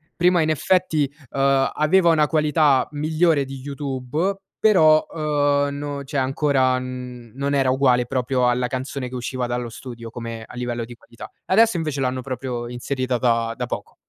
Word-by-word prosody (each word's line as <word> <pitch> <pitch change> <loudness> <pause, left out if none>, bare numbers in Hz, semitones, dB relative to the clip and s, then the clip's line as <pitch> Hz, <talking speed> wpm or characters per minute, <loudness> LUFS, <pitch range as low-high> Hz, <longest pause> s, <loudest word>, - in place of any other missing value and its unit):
prima 175 -1 +3
in 155 0 +1
effetti, 155 -3 +1 0.2
uhm, 135 0 +2
aveva 170 +3 +3
una 150 -2 +3
qualità 150 -3 +3
migliore 155 0 +1
di 135 0 -8
YouTube, 140 +6 -3 0.2
però, 155 -8 +5
uhm, 145 -2 0
no 145 -1 -5
cioè 140 +1 -5
ancora 130 -1 +2
non 125 +2 -5
era 135 -2 +2
uguale 125 -2 +3
proprio 125 0 0
alla 125 0 +1
canzone 130 0 -4
che 130 - -8
usciva 125 0 -3
dallo 120 -1 -3
studio 115 -1 -9
come 115 -1 -6
a - - -14
livello 120 -1 -3
di 120 - -11
qualità. 115 0 -12 0.2
Adesso 220 0 +4
invece 155 -4 -2
l'hanno 130 -1 -1
proprio 125 -2 -5
inserita 130 0 -2
da 115 -1 +1
da 125 - -2
poco. - - -6
135 Hz, 160 wpm, -22 LUFS, 125-150 Hz, 0.2 s, però